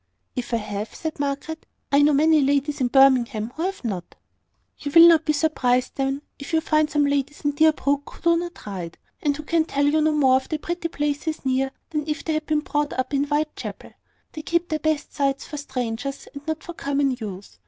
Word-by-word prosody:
"If 250 - -4
I 230 - +2
have," 210 -1 -5
said 315 -2 -5
Margaret, 285 +3 -3 0.2
"I 280 +1 +5
know 295 +1 +5
many 310 +2 +4
ladies 280 +1 +1
in 250 - +3
Birmingham 245 -4 +4
who 320 - -5
have 385 -1 -3
not." 190 -6 -4 0.6
"You 285 - -4
will 335 0 +11
not 325 -2 +5
be 305 - +2
surprised, 255 -5 +1
then, 270 +1 -2 0.2
if 280 +4 -8
you 320 - +5
find 305 -1 +2
some 295 -2 +2
ladies 285 0 -1
in 290 - +3
Deerbrook 285 -2 +2
who - - -15
do 335 0 +4
not 345 0 -6
ride, 180 -5 -6 0.2
and 285 -1 +1
who 305 - -7
can 330 +1 +2
tell 285 -2 0
you 305 +2 +3
no 310 0 +3
more 265 -3 +4
of 265 - -6
the 310 - -1
pretty 340 +2 -3
places 295 0 -3
near 265 +1 +1 0.2
than 300 -1 -2
if 300 - -2
they 320 - 0
had 310 0 -2
been 305 -1 +1
brought 295 -1 -1
up 260 +2 -2
in 280 0 +2
Whitechapel. 300 +1 -3 0.4
They 310 - -7
keep 340 +2 0
their 310 - -1
best 310 -1 -1
sights 275 -1 0
for 295 - -7
strangers, 265 -1 -4
and 285 +1 -10
not 315 0 -3
for 345 - -7
common 280 -3 0
use. 200 -3 -8
290 Hz, 215 wpm, -23 LUFS, 270-310 Hz, 0.6 s, will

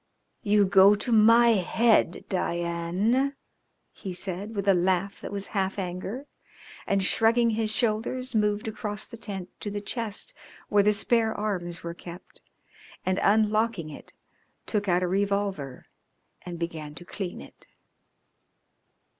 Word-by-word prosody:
"You 205 -2 +3
go 195 +1 +6
to 210 +4 -3
my 230 +2 +6
head, 220 -1 +2
Diane," 180 +10 0 0.6
he 190 -3 -7
said, 195 +4 -4
with 200 -1 -3
a 195 - +6
laugh 185 +2 0
that - - -7
was 200 -1 -4
half 195 -1 -1
anger, 190 +8 -5 0.6
and 195 -1 +1
shrugging 230 +4 +3
his 220 -1 0
shoulders 240 +3 0
moved 210 0 +1
across 210 -1 -4
the - - -11
tent 200 -5 -6
to 205 - -4
the 205 0 -4
chest 230 - -4 0.4
where 205 - +4
the 210 +1 +4
spare 225 +1 +2
arms 180 -5 -3
were 170 0 -4
kept, 175 +1 -12 0.6
and 185 0 +1
unlocking 215 -4 +2
it - - -12 0.5
took 210 -2 0
out 180 0 +2
a - - +1
revolver 195 -8 -2 0.6
and 175 -1 -7
began 160 -3 -5
to 175 - -10
clean 185 -1 -6
it. - - -15
200 Hz, 140 wpm, -27 LUFS, 180-220 Hz, 0.6 s, go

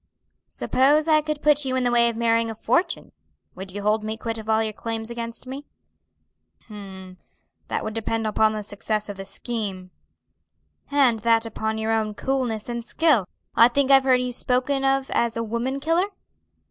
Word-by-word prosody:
"Suppose 290 +4 +2
I 310 -1 +5
could 305 -1 -4
put 295 -1 +4
you 260 -1 -1
in 260 - +1
the 245 - +1
way 235 0 +4
of 230 - -5
marrying 230 0 +2
a 225 - -5
fortune, 250 - 0 0.4
would 190 0 -8
you 205 +2 -6
hold 215 +1 +1
me 220 +1 -4
quit 225 -1 -4
of 220 0 -9
all 220 0 +3
your 215 -1 -3
claims 225 +1 -5
against 230 0 -6
me?" 270 +3 -8 1.0
"H'm, 190 -3 -10 0.5
that - - -2
would 215 - -4
depend 225 0 -2
upon 215 0 +2
the 215 -1 -4
success 210 +1 -3
of 200 - -6
the 195 - -7
scheme." 195 -3 -4 1.0
"And 270 -6 +3
that 230 +1 +3
upon 220 0 -3
your 220 0 -1
own 215 -2 0
coolness 250 -5 -2
and 235 -1 -4
skill. 270 - +2 0.3
I 230 - +8
think 275 +2 +1
I've 270 -1 +6
heard 255 -1 +4
you 250 0 -2
spoken 255 +3 0
of 270 0 +1
as 235 -1 0
a 230 - -1
woman 235 +5 -2
killer?" 330 +6 +1
230 Hz, 185 wpm, -24 LUFS, 215-265 Hz, 1.0 s, I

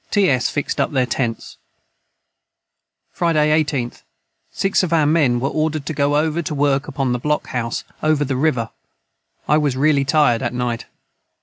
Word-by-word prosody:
ts 185 -12 +2
fixed 145 - -2
up - - 0
their 130 -2 +2
tents. 120 -2 -3 1.5
Friday 155 -3 +1
18th. 135 -5 -4 0.5
6 195 0 +1
of 180 -3 -2
our 160 -3 +3
men 145 -6 +3
were 135 - -1
ordered 155 -1 -1
to 155 - -3
go 145 0 +1
over 160 +2 0
to 155 -2 -4
work 140 -1 +1
upon 135 -3 -2
the 125 - -1
Block 150 +4 -1
House 115 -2 -3 0.2
over 155 -1 +2
the 135 -1 -2
river 125 -5 0 0.8
I 150 +1 +4
was 145 -4 0
raly 140 0 +3
tired 135 -5 +3
at - - -2
night. 120 -2 -3
145 Hz, 165 wpm, -20 LUFS, 125-155 Hz, 1.5 s, I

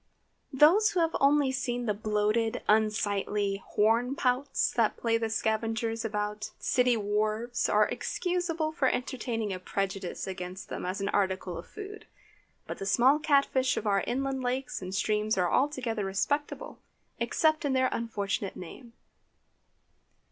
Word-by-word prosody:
✠ - - -8
Those 390 +9 +6
who 365 - -1
have 330 -1 +1
only 280 -1 +4
seen 245 -2 -2
the 210 - +1
bloated, 215 +2 0
unsightly 205 -2 +1
"hornpouts" 250 +5 +2
that 230 -3 +1
play 230 -1 +1
the 225 -1 -1
scavengers 225 +1 -1
about 210 0 -3
city 250 -2 +2
wharves, 215 +3 -1
are - - +4
excusable 350 -3 -2
for 295 -4 +1
entertaining 235 -5 -2
a 185 - -5
prejudice 195 0 -3
against 185 +1 -6
them - - -4
as 185 +2 -3
an 200 - -1
article 190 -2 0
of 170 - -8
food. 415 0 -9 0.6
But - - -6
the 195 - -4
small 255 +8 +4
cat 285 -2 +4
fish 260 -1 0
of - - -3
our 200 -2 +2
inland 265 +2 -1
lakes 255 -1 -2
and 185 +1 -5
streams 210 +1 0
are 180 -2 +1
altogether 255 -6 0
respectable, 285 - -2 0.4
except 315 0 +1
in 285 -2 0
their 260 0 +3
unfortunate 205 -3 -2
name. 230 +7 -10
225 Hz, 145 wpm, -29 LUFS, 205-265 Hz, 0.6 s, Those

